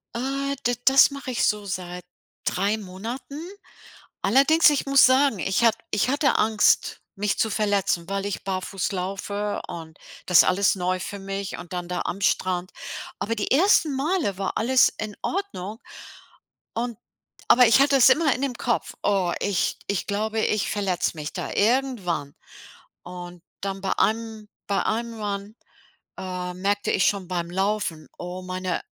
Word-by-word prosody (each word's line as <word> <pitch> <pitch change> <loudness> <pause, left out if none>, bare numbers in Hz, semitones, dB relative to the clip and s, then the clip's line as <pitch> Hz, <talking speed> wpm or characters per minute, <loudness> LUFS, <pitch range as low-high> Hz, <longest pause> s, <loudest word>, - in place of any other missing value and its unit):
Äh, 275 +3 -2
d 245 - +1
das 270 +2 +7
mache 280 -2 -6
ich 240 - 0
so 210 -1 0
seit 180 -2 -5 0.4
3 200 +4 +1
Monaten. 230 +9 -7 0.8
Allerdings, 280 - +5
ich 290 -2 0
muss 275 -2 +6
sagen, 260 -4 +3
ich 190 +8 0
ha 230 - +7 0.2
ich 210 +4 +1
hatte 285 +1 +2
Angst, 215 -1 +2
mich 205 +1 -1
zu 220 - +2
verletzen, 200 -5 0
weil 195 0 -2
ich 205 - -4
barfuß 190 0 -3
laufe 200 +2 -3
und 160 -1 -8 0.3
das 180 -2 +6
ist - - +9
alles 195 +2 +2
neu 185 0 -1
für 200 +2 -6
mich 195 -1 -5
und 175 - -10
dann 175 -1 -4
da 180 0 -2
am 195 - -4
Strand. 185 -2 0 0.5
Aber 230 +2 -1
die 205 - -2
ersten 310 -2 +4
Male 285 - 0
war 195 - -2
alles 255 +3 +4
in 215 -1 -5
Ordnung, 235 - -4 1.0
und 235 -1 -3 0.5
aber 250 0 +7
ich 230 +4 +5
hatte 280 0 +4
es 260 - +7
immer 300 +1 +4
in 255 - -5
dem 255 -3 -1
Kopf: 235 - -1
„Oh, 190 -4 +1
ich 200 -3 0
ich 200 -2 -2
glaube, 215 +2 -1
ich 215 -2 0
verletze 195 -4 0
mich 150 -1 -5
da - - -4
irgendwann.” 210 - 0 0.7
Und 175 -1 -9 0.2
dann 195 -1 -3
bei 195 - -1
einem 220 -1 -1 0.2
bei 200 - +1
einem 230 0 -2
Run, 200 +1 -4 0.6
äh, 180 -1 -4
merkte 200 +2 -1
ich 185 - +3
schon 195 -3 0
beim 175 -2 -2
Laufen, 190 -4 -1
oh, 180 +1 -6
meine 185 0 -3
205 Hz, 160 wpm, -24 LUFS, 185-240 Hz, 1.0 s, ist